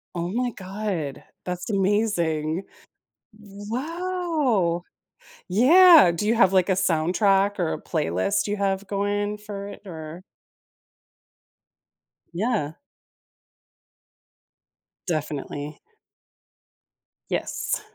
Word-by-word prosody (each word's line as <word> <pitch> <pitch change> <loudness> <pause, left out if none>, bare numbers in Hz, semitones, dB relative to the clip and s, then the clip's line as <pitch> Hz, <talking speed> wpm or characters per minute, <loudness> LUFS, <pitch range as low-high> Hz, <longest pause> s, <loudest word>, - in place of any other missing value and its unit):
Oh 170 0 -2
my 245 +5 -1
god. 190 - -5 0.2
That's 180 +2 -4
amazing. 190 -5 0 0.8
Wow! 250 - -2 0.7
Yeah. 300 - +7
Do 210 +5 -2
you 230 - +3
have, 190 -5 +5
like, 185 -2 +4
a - - +4
soundtrack 195 +4 +2
or 170 -3 0
a - - -6
playlist 95 - -1
you 205 0 -2
have 195 0 -1
going 205 +1 -1
for 205 -1 -7
it 205 - -10
or 160 -1 -8 2.1
Yeah. 195 -5 -1 2.3
Definitely. 150 -2 -4 1.5
Yes. - - -2
200 Hz, 85 wpm, -24 LUFS, 170-215 Hz, 2.3 s, Yeah